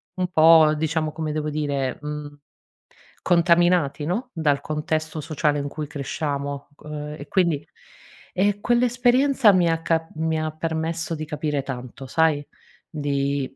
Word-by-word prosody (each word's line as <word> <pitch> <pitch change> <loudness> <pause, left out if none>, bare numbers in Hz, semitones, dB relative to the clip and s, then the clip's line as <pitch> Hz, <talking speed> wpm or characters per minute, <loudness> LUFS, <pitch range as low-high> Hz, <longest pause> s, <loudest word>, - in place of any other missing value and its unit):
un 185 -1 -1
po' 160 -1 +7
diciamo, 155 0 -1
come 155 0 -4
devo 155 0 -2
dire, 140 -4 -2
mhmm, 150 0 -6 0.8
contaminati 170 -4 +3
no, 220 - -2
dal 145 -4 +1
contesto 155 +1 -2
sociale 150 -1 0
in 140 - -3
cui 150 +1 -5
cresciamo, 140 0 -4
uhm, 150 0 -7
e 145 - -9
quindi, 170 -6 +1 0.7
ehm, 200 +2 +1
quell'esperienza 245 +1 +4
mi 175 -2 +3
ha 165 0 0
ca 165 0 0
mi 160 0 -1
ha 155 0 -2
permesso 165 +1 -3
di 155 0 -5
capire 150 -2 -2
tanto 130 0 -7
sai? 155 0 +2 0.4
Di 140 -2 -1
155 Hz, 135 wpm, -23 LUFS, 145-170 Hz, 0.8 s, po